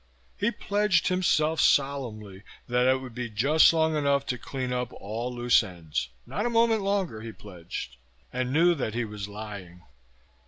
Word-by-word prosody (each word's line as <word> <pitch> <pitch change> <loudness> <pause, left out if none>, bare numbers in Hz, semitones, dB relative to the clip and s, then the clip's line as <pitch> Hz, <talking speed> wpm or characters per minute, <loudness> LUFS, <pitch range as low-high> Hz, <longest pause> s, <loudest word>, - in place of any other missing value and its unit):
He 205 - +1
pledged 205 -6 +1
himself 160 -4 +2
solemnly 115 -9 0 0.3
that 125 +1 +2
it 130 0 +3
would 130 -2 -9
be 120 0 -4
just 135 +9 +5
long 160 -1 +1
enough 140 -2 +1
to 125 - -2
clean 130 -2 -4
up 125 -1 -2
all 115 +5 -5
loose 120 0 +4
ends 85 - -4 0.2
not 210 - -3
a - - 0
moment 230 -2 +3
longer, 195 - -1
he 115 0 -7
pledged. 90 - -8 0.4
And 125 0 -1
knew 170 +5 +4
that 125 -8 -3
he 120 -1 0
was 105 -2 -6
lying. 100 -4 -9
125 Hz, 165 wpm, -27 LUFS, 105-160 Hz, 0.4 s, just